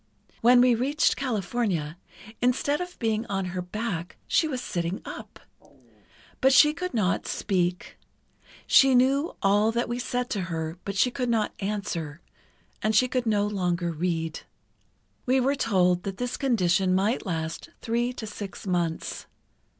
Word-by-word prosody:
When 245 +1 +6
we 250 -1 +5
reached 285 +7 +2
California, 205 - -2 0.5
instead 265 +5 +1
of 360 0 -6
being 220 -2 0
on 195 -1 -2
her 180 - -2
back, 180 -2 -4
she 320 - +2
was 265 -5 -3
sitting 175 -5 -3
up. - - -9 1.0
But 265 0 +4
she 300 +3 +7
could 365 -1 -5
not 195 -4 0
speak—she 185 +7 0
knew 275 +6 +2
all 205 +3 +4
that 235 +1 -1
we 240 +1 -3
said 250 0 -2
to 200 - -1
her, 165 0 -4
but 200 - -4
she 250 +6 +3
could 250 -1 -2
not 225 -2 +1
answer, 195 -7 -3 0.6
and 215 0 +1
she 255 +4 +5
could 250 -2 -1
no 205 -2 +2
longer 180 -4 -1
read. 165 -1 -2 0.9
We 260 +1 +4
were 265 +2 +2
told 185 -9 +2
that 195 +1 -5
this 245 0 -2
condition 190 -7 +2
might 205 +6 +1
last 160 -2 -4
three 240 +1 -1
to 230 - -7
six 205 -3 -8
months. 175 -3 -2
210 Hz, 150 wpm, -26 LUFS, 180-250 Hz, 1.0 s, she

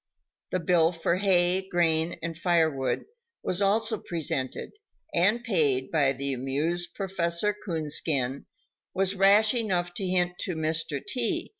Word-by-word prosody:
The 185 - 0
bill 165 -1 +3
for 170 0 -1
hay, 185 -1 +2
grain 165 -2 +1
and 165 0 -4
firewood 160 -6 0 0.4
was 180 +2 0
also 220 +2 +1
presented 145 -6 -3 0.4
and 210 +7 +2
paid 145 - +1
by 145 -4 +3
the 140 +1 -2
amused 155 +7 -2
Prof. 195 -1 -6 0.5
Coonskin 150 -6 -1 0.5
was 195 0 +1
rash 200 +3 +5
enough 185 -7 -1
to 190 +1 -3
hint 180 -1 0
to 180 - -2
Mr. 160 -2 -1
T. 255 +7 -1
175 Hz, 130 wpm, -27 LUFS, 155-190 Hz, 0.5 s, rash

